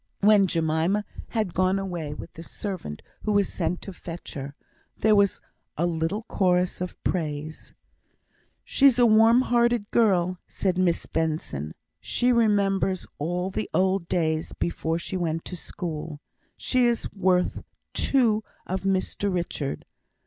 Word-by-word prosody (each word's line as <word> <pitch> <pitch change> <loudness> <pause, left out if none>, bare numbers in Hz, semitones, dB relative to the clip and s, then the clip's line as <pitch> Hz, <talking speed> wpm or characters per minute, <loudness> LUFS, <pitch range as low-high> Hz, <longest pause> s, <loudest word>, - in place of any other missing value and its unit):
When 205 -1 +6
Jemima 165 +5 +1 0.2
had 215 -7 -2
gone 185 +1 +2
away 175 -6 -4
with - - -9
the 165 - -10
servant 175 - -6 0.2
who 210 - 0
was 205 -1 +2
sent 175 0 -2
to 195 - -7
fetch 170 0 -8
her, 140 0 -6 0.4
there 215 0 +4
was 200 -1 +3 0.4
a 170 - +1
little 170 +5 -1
chorus 180 -4 +1
of 180 - -4
praise. 155 -2 -3 0.9
"She's 275 -3 +4
a 245 - +6
warm 225 +2 +6
hearted 240 -3 +1
girl," 185 -6 +2
said 185 -2 -1
Miss 175 -2 +1
Benson. 155 - -2 0.2
"She 250 +1 +1
remembers 200 -5 +2
all 175 +5 -1
the 215 - -3
old 190 -1 +2
days 160 -2 0
before 165 -1 -1
she 185 +2 -4
went 165 -2 -2
to 180 - -5
school. 160 -3 -5 0.4
She 255 -2 +2
is 235 -1 0
worth 185 -2 +1 0.3
two 225 -6 +2 0.2
of 190 0 -2
Mr 195 +1 0
Richard. 170 -6 -3
185 Hz, 140 wpm, -26 LUFS, 165-205 Hz, 0.9 s, When